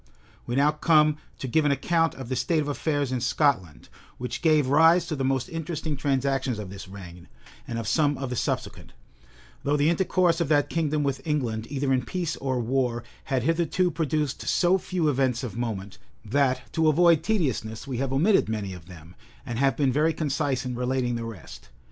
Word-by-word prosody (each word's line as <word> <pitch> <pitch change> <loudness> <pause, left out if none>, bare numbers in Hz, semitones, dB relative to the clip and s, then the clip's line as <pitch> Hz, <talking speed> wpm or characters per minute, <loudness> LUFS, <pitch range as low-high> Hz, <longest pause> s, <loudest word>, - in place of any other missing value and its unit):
We 120 - -2
now 145 +2 +4
come 155 -1 +3 0.2
to 135 - -5
give 155 +6 +2
an 145 - +2
account 165 +4 +1
of 130 -3 -8
the 130 - -2
state 155 +6 +1
of 150 - -1
affairs 145 -2 -1
in 125 -2 -1
Scotland, 115 - 0 0.3
which 125 0 -5
gave 155 -4 +4
rise 160 +5 +5
to 165 -3 -3
the 135 - -2
most 130 -1 0
interesting 160 -2 -4
transactions 135 -3 0
of 100 -3 -7
this 100 -1 -9
reign, 90 -3 -11 0.4
and 115 - -4
of 115 -2 -4
some 145 +5 +2
of 135 -2 -4
the - - -2
subsequent; - - -3 0.7
though 145 +1 +1
the 150 +3 +3
intercourse 175 -1 +2
of 170 - +1
that 145 -1 +2
kingdom 155 -2 0
with 140 -1 -1
England, 120 -8 -2
either 135 -1 0
in 130 - +2
peace 175 -1 -3
or 130 -2 -2
war, 120 -1 0 0.2
had 130 -3 -1
hitherto 170 +3 +1
produced 155 -3 -2
so 185 +1 +3
few 175 -3 -1
events 130 -3 +1
of 120 - -5
moment, 105 -5 -4 0.3
that, 130 +2 0
to 160 -1 +2
avoid 165 0 +5
tediousness, 135 - -1
we 130 -3 -4
have 135 +1 -2
omitted 165 - +3
many 105 -4 -3
of 90 -2 -12
them, 85 -2 -13 0.3
and 120 -1 -4
have 135 -3 +2
been 135 -3 +2
very 155 +3 +2
concise 135 -3 -1
in 125 - -3
relating 125 0 -1
the 115 -1 -3
rest. 90 - -10
135 Hz, 195 wpm, -26 LUFS, 120-155 Hz, 0.7 s, rise